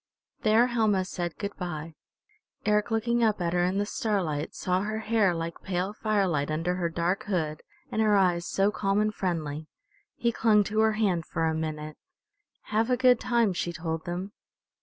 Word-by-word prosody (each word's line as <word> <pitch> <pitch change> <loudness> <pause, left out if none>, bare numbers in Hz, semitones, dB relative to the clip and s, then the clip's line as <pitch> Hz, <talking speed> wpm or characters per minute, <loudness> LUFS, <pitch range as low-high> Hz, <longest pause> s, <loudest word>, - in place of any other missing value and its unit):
There 225 +1 +5
Helma 220 -6 +1
said 175 -3 -4
good 200 -1 -4
by. 165 -3 -5 0.7
Eric 210 0 +2
looking 235 +1 +1
up 215 -3 +2
at 170 -1 -1
her 175 0 +2
in 185 +2 +1
the 205 - +1
starlight 185 -9 -2
saw 185 0 0
her 215 +2 -2
hair 215 -5 +2
like 165 0 -5
pale 185 +2 -2
firelight 195 -10 0
under 165 +3 0
her 170 -2 0
dark 170 +3 -1
hood 160 -6 -2 0.3
and 220 - 0
her 215 -1 +4
eyes 180 -3 +2
so 195 +1 +2
calm 195 -1 0
and 215 0 +1
friendly. 155 -5 -3 0.5
He 235 0 +1
clung 215 -2 +4
to 215 +2 -2
her 220 0 +4
hand 195 -7 0
for 165 - -1
a 160 - +1
minute. 155 -1 -4 0.8
"Have 225 +3 +2
a 250 - +3
good 250 -2 +5
time," 235 -5 +2
she 175 0 -2
told 160 -1 -4
them. 180 +3 -4
190 Hz, 180 wpm, -28 LUFS, 170-215 Hz, 0.8 s, There